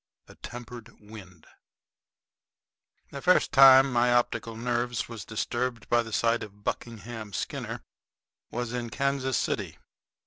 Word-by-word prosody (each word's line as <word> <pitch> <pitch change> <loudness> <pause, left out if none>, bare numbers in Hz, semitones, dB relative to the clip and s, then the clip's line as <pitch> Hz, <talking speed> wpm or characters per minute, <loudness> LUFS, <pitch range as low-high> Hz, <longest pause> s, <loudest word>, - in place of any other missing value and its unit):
A - - -14
TEMPERED 120 -1 -10
WIND 100 -6 -13 1.7
The 140 - -7
first 180 +4 +3
time 135 -1 +8
my 120 0 +3
optical 120 -1 0
nerves 120 +1 -2
was 115 -5 -8
disturbed 120 +2 -3
by 120 0 +4
the 115 -1 -8
sight 115 +2 +1
of 105 0 -10
Buckingham 115 -2 -5
Skinner - - -4 0.7
was 120 0 -4
in 120 -1 -3
Kansas 135 +1 -1
City. - - -2
120 Hz, 125 wpm, -27 LUFS, 110-125 Hz, 1.7 s, time